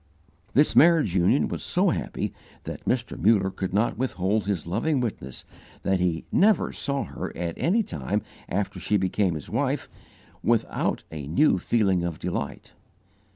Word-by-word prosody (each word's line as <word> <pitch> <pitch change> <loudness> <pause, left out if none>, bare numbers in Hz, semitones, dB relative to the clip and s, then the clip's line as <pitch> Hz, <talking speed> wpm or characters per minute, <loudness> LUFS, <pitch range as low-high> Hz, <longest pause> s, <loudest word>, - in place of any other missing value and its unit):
This 145 +3 +4
marriage 160 - +5
union 90 -2 +3
was - - -4
so - - +2
happy - - -3 0.3
that - - -7
Mr. 125 -1 -1
Muller 100 -3 +3
could 95 -1 -4
not 105 +6 +1
withhold 105 -4 0
his 95 -6 -1
loving 120 - 0
witness 100 - -4 0.4
that 95 -1 +1
he 85 -2 0
never 205 -2 +3
saw 140 -1 -2
her - - -6
at 85 -1 -2
any 215 +7 +2
time 70 - -3 0.3
after 100 +2 -2
she 105 - +1
became 95 -1 0
his 75 - -6
wife, - - -1 0.6
without 115 -1 0
a 75 -3 -6
new 95 - +3
feeling 95 -4 +1
of 85 -3 -3
delight. 85 -5 -4
95 Hz, 155 wpm, -26 LUFS, 85-125 Hz, 0.6 s, marriage